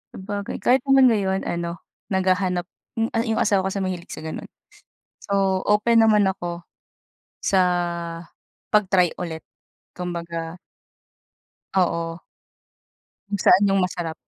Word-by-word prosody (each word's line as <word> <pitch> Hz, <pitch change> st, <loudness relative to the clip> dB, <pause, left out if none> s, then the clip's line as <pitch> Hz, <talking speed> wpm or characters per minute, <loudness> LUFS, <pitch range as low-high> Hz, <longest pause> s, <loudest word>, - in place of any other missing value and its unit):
Sabagay, 200 Hz, +1 st, -5 dB
kahit 255 Hz, +2 st, +5 dB
naman 270 Hz, -2 st, +6 dB
ngayon 195 Hz, -3 st, 0 dB
ano, 170 Hz, 0 st, -3 dB, 0.3 s
naghahanap 185 Hz, -1 st, +1 dB, 0.3 s
hmm, 225 Hz, 0 st, -1 dB, 0.2 s
yung 225 Hz, -, +1 dB
asawa 195 Hz, -3 st, +2 dB
kasi 195 Hz, 0 st, -2 dB
mahilig 180 Hz, -2 st, -4 dB
sa -, -, -9 dB
ganun. 160 Hz, -, -6 dB, 0.7 s
So, 195 Hz, -2 st, +1 dB
open 225 Hz, +3 st, +4 dB
naman 215 Hz, -2 st, +5 dB
ako, 175 Hz, -2 st, -3 dB, 0.8 s
sa 190 Hz, -, +3 dB, 1.1 s
'pag-try 190 Hz, -4 st, +3 dB
ulit, 160 Hz, -3 st, -5 dB, 0.5 s
kumbaga 170 Hz, -1 st, -5 dB, 1.2 s
Oo. 170 Hz, -2 st, 0 dB, 1.1 s
Kung 200 Hz, -1 st, -2 dB
saan 200 Hz, -, +6 dB
yung 195 Hz, -1 st, +3 dB
masarap. 175 Hz, -3 st, -2 dB
190 Hz, 110 wpm, -23 LUFS, 175-205 Hz, 1.2 s, naman